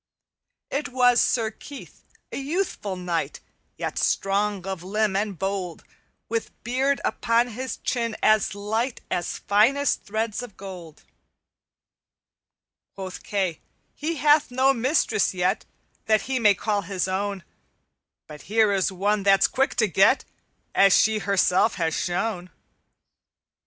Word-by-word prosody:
"It 285 +2 -2
was 245 -2 +4
Sir 225 -3 +1
Keith, 280 +5 -12 0.3
a - - -4
youthful 280 - -2
knight, 180 -2 -3 0.4
Yet - - -3
strong 200 -1 0
of 190 -3 -4
limb 205 +2 0
and 200 -1 -1
bold, 190 -3 -3 0.4
With 230 0 -2
beard 265 +4 +1
upon 235 0 +1
his 255 +3 -5
chin 230 -2 -2
as 215 -4 +3
light 220 +5 -2
As 175 - -2
finest 250 +8 +2
threads 220 +1 -3
of 235 -6 -10
gold. 180 -5 -10 1.9
"Quoth 190 -1 -7
Kay, 190 -5 -2 0.3
'He 320 +3 -3
hath 295 +1 +4
no 260 +2 +3
mistress 240 - +1
yet 185 +3 0 0.4
That 215 -1 +4
he 265 -1 -1
may 210 -3 +5
call 205 +1 -1
his 185 0 -2
own, 195 0 -2 0.8
But 150 -2 -11
here 220 -1 +4
is 195 -1 +1
one 200 +3 0
that's 195 0 +4
quick 270 +1 0
to 220 - +3
get, 195 - +3 0.5
As 195 -1 +6
she 220 0 +3
herself 200 +1 +2
has 165 -3 -1
shown.' 180 0 -2
210 Hz, 130 wpm, -24 LUFS, 190-240 Hz, 1.9 s, As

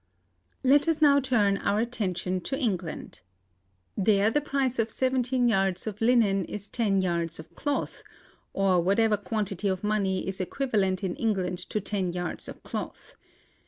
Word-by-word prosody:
"Let 280 +4 +4
us 325 -2 +1
now 285 -2 +6
turn 215 -7 +2
our 205 - +1
attention 185 -6 -2
to 270 - -1
England. 190 - -3 0.7
There 205 +1 +3
the 295 - +1
price 270 -4 -1
of 225 0 +1
seventeen 255 0 +1
yards 195 -4 +1
of 215 -1 -5
linen 225 -5 +3
is 205 +2 -7
ten 200 -5 +1
yards 170 -2 -1
of 160 - -11
cloth, 290 -1 -3 0.5
or 190 -3 +2
whatever 210 +4 +3
quantity 205 -2 -2
of 190 0 -1
money 200 -3 0
is 190 0 -3
equivalent 200 -4 0
in 180 -2 -2
England 185 -5 -1
to 215 - -1
ten 190 -3 -2
yards 175 -1 -4
of - - -10
cloth. - - -6
205 Hz, 155 wpm, -27 LUFS, 190-240 Hz, 0.7 s, now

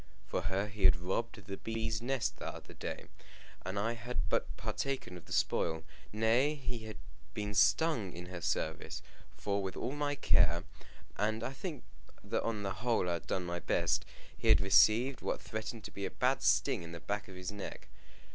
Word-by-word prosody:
For - - -1
her 95 +1 0
he 100 -2 -3
had 75 - +9
robbed 95 +4 -2
the 95 -1 -5
bees' 110 -1 -2
nest 130 -1 0
that - - -6
very - - -11
day, - - -5 0.6
and 95 +2 -3
I 115 +3 +1
had 120 +2 -5
but - - +2
partaken 110 -1 -2
of 85 - -10
the - - -15
spoil. 80 -1 +1 0.3
Nay, 115 +7 +3
he 125 -5 -4
had 110 - -7 0.4
been 105 -1 -2
stung 110 - +4
in 85 +1 -7
her 90 -1 -6
service; 80 0 -1 0.3
for, 100 0 0
with 95 -1 -4
all 125 - -1
my 145 0 0
care 85 - +4 0.5
and 110 +2 +1
I 130 - -2
think 150 0 -5 0.4
that - - 0
on 110 -3 -1
the 100 -1 -1
whole 115 -1 +1
I 85 - +2
had 85 - -4
done 90 - 0
my 85 0 -2
best - - +2 0.3
he - - -3
had 110 - +8
received 110 +6 +5
what - - -1
threatened 110 0 -5
to - - -7
be 100 - -3
a - - -4
bad - - +1
sting - - +3
on 85 0 -8
the 85 - -6
back 105 +3 -3
of 95 - -10
his 90 +1 -4
neck. 100 -1 -7
105 Hz, 195 wpm, -34 LUFS, 95-115 Hz, 0.6 s, had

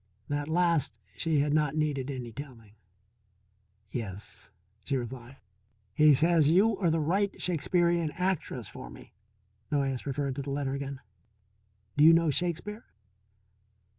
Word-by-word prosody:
That 145 +1 -2
last 165 -8 +2 0.2
she 160 -3 +1
had 145 0 0
not 150 -1 +1
needed 145 -3 -1
any 125 -4 -5
telling. 115 -4 -10 1.2
"Yes," 105 -4 -7 0.3
she 140 - -1
replied. 125 +1 -7 0.6
"He 150 +2 +6
says 165 +1 +4
you 200 +6 +4
are 180 -4 +2
the 160 0 +1
right 190 +6 0
Shakespearian 170 -1 +1
actress 185 -2 -2
for - - -9
me," - - -14 0.6
Noyes 135 -3 -1
referred 140 -1 -2
to - - -2
the 140 - -6
letter 140 -1 -2
again. 140 -1 -5 1.0
"Do 145 - +5
you 165 +2 +9
know 165 -2 +3
Shakespeare?" 180 - -3
150 Hz, 135 wpm, -29 LUFS, 135-170 Hz, 1.2 s, you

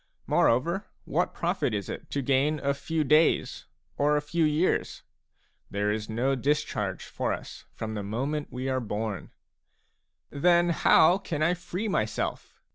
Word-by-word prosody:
Moreover, 170 +12 +2 0.2
what - - 0
profit - - -1
is 100 -2 -3
it - - -7
to 140 - -2
gain 140 +4 +2
a 140 0 +2
few 160 +3 -2
days 155 +3 +2 0.3
or 150 +1 +3
a - - 0
few 165 +2 0
years? 155 +4 0 0.7
There 105 +1 0
is 110 0 -3
no 120 +5 0
discharge 145 +3 -1
for - - -2
us - - -7
from 110 0 -4
the 105 - -3
moment 135 +9 -2
we 130 +1 -4
are 130 -1 0
born. 105 -4 -4 1.0
"Then 175 +4 +3
how 170 +2 +5
can 155 -6 -2
I 170 +3 +3
free 180 +4 -4
myself?" 110 - -2
140 Hz, 150 wpm, -27 LUFS, 115-160 Hz, 1.0 s, how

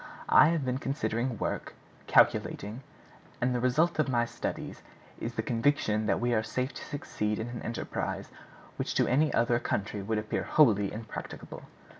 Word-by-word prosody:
I - - +8
have 160 -4 +1
been 130 +1 -1
considering, 120 -3 -1
working, - - -3 0.3
calculating; 110 +5 +3 0.6
and 125 0 +1
the 125 - 0
result 155 +8 +2
of 150 - +2
my 120 -2 +2
studies - - -5 0.4
is 120 +1 -4
the 110 - -1
conviction 115 -3 +1
that - - +2
we 120 0 +1
are 110 - +3
safe 125 +5 -2
to - - -8
succeed 105 -7 -3
in 110 +2 -4
an 120 -1 -6
enterprise 115 - -4 0.5
which - - -2
to - - +4
any 150 +5 +3
other 120 0 +2
country 100 -2 -2
would 110 +3 -1
appear 105 0 -2
wholly 105 -10 +4
impracticable. 110 0 -7
120 Hz, 165 wpm, -29 LUFS, 110-130 Hz, 0.6 s, I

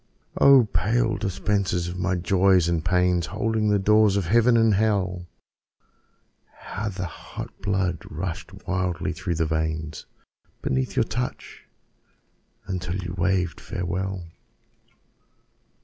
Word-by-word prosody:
Oh, 135 -3 +7
pale 110 +5 +1
dispensers 95 -2 -1
of 90 +1 -5
my 95 0 0
Joys 90 0 +3
and 85 -2 0
Pains, 90 -1 +2
Holding 110 0 0
the 105 - +4
doors 105 0 +4
of 100 - 0
Heaven 115 +5 +4
and 115 -1 +4
of 100 - +2
Hell, 95 -5 0 1.3
How 110 0 -5
the 95 -2 -4
hot 85 - -8
blood 95 -4 0
rushed 85 +1 -5 0.2
wildly 95 -2 -1
through 90 +1 -3
the 80 0 +1
veins 80 0 -3 0.6
Beneath 65 0 -1
your - - +3
touch, 60 - -5 1.0
until 90 -2 -3
you 90 -2 -4
waved 90 -2 0
farewell. 90 +1 -3
95 Hz, 120 wpm, -24 LUFS, 85-100 Hz, 1.3 s, Oh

